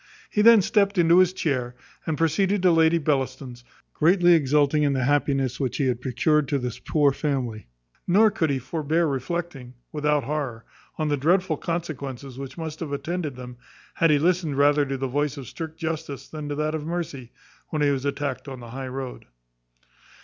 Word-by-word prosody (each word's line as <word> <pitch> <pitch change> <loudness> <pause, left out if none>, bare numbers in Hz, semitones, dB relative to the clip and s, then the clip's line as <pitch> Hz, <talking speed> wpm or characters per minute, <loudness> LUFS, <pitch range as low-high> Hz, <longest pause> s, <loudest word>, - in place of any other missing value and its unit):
He 210 - +2
then 225 -2 +7
stept 205 -1 +2
into 170 +1 +5
his 185 -1 +5
chair, 130 -9 -2 0.3
and 160 -2 -1
proceeded 185 +5 +1
to 180 - +6
Lady 165 0 +4
Bellaston's, 130 -4 -2 0.3
greatly 175 +2 +4
exulting 150 -1 +3
in 145 -1 +2
the 130 -1 0
happiness 135 -2 +1
which 130 -4 -2
he 140 - +1
had 125 -2 -1
procured 135 +4 +1
to 140 - 0
this 125 -3 -4
poor 145 -3 +2
family; 130 - -3 0.4
nor 210 +4 +5
could 165 -6 0
he 140 - +1
forbear 155 +5 -1
reflecting, 135 -2 -4 0.2
without 150 -1 +1
horror, 135 -5 -4 0.3
on 155 -1 -1
the 145 - +1
dreadful 175 +4 +2
consequences 140 -6 -5
which 135 +3 -8
must 160 -2 -6
have 160 -4 -5
attended 155 0 -3
them, 125 -1 -9 0.4
had 165 - +2
he 150 - +5
listened 165 -2 +1
rather 145 0 +4
to 135 0 -3
the 135 - -3
voice 145 +2 -1
of 135 -3 -8
strict 160 -1 -7
justice 160 -3 -4
than 150 -2 -7
to 145 - -2
that 155 +1 -1
of 155 -1 -3
mercy, 150 -7 -5 0.4
when 155 -2 -1
he 145 - +3
was 135 -2 -2
attacked 140 -1 -3
on 130 -2 -7
the 120 -1 -10
high 135 +1 -5
road. 130 -1 -6
145 Hz, 185 wpm, -24 LUFS, 135-165 Hz, 0.4 s, then